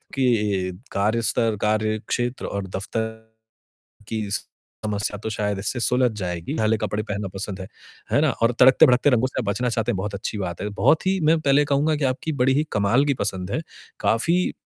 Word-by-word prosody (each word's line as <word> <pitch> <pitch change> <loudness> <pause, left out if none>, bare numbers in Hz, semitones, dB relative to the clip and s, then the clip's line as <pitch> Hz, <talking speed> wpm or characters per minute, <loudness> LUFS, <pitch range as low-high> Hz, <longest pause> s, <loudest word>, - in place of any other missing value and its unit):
कि 105 -8 +1 0.2
कार्य 105 +4 +1
स्तर, 115 -1 +1
कार्यक्षेत्र 110 +3 -1
और 100 -1 -4
दफ्तर 110 +4 -3 1.0
की 110 -2 -3 0.6
समस्या 105 0 -1
तो 110 +2 -5
शायद 105 -1 -2
इससे 105 +5 -1
सुलझ 125 +1 +3
जाएगी। 90 -3 -4
ढीले 110 0 +2
कपड़े 105 0 -2
पहनना 105 -1 -4
पसंद 95 0 -5
है, 95 - -6 0.5
है - - +4
ना? - - +3
और 115 +1 +1
तड़कते-भड़कते 130 +1 +6
रंगों 125 -1 +3
से - - -3
बचना 105 +5 -1
चाहते 115 -2 0
हैं, - - -2
बहुत 100 +2 -4
अच्छी 100 +2 -4
बात 90 -4 -4
है। 105 - -2
बहुत 155 - +2
ही 190 0 +2
मैं 160 +1 +4
पहले 145 0 +3
कहूँगा 150 +3 +2
कि 145 - -2
आपकी 140 +5 -3
बड़ी 130 +1 +3
ही 150 +3 +2
कमाल 105 +6 +3
की 140 - +2
पसंद 95 -5 -2
है। - - 0 0.4
काफ़ी 170 +11 +1
110 Hz, 185 wpm, -23 LUFS, 100-130 Hz, 1.0 s, तड़कते-भड़कते